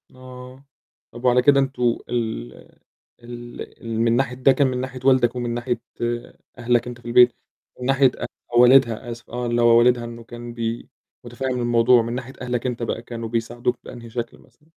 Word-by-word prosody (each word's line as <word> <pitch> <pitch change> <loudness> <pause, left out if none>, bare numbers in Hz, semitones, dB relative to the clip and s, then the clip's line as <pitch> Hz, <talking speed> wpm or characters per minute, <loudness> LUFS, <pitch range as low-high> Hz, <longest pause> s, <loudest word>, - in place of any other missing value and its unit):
آه، 130 +1 -12 0.5
طَب 120 +2 -9
وعلى 125 0 +5
كده 140 +1 +5
أنتم 125 -3 0
ال 110 - -3 0.7
ال 120 0 -9 0.2
ال 115 -1 -3
من 115 0 +3
ناحية 125 0 0
ده 130 +1 +4
كان 140 0 +3
من 125 - -2
ناحية 130 0 -6
والدك؟ 130 -2 +4
ومن 120 -1 -3
ناحية 120 +1 -2 0.8
أهلك 120 0 +1
أنت 120 -1 -8
في - - -25
البيت؟ 120 0 +6 0.5
من 125 - -5
ناحية 135 -1 +4
أ - - -5 0.3
والدها؟ 120 -1 +5
آسف 115 0 -10
آه، 125 0 -4
اللي 120 0 0
هو 115 0 +6
والدها 120 0 +4
إنه 115 0 -9
كان 120 0 -9
بي 115 0 -4 0.4
متفهّم 125 +1 -3
الموضوع، 120 +1 +4
من 115 +1 -4
ناحية 130 +1 -6
أهلك 125 -1 -3
أنت 125 -2 -2
بقى 115 - -3
كانوا 115 -1 -7
بيساعدوك 120 +2 -2
بأنهي 115 -1 -10
شكل 120 0 -5
مثلًا؟ 150 - -25
120 Hz, 185 wpm, -22 LUFS, 120-125 Hz, 0.8 s, البيت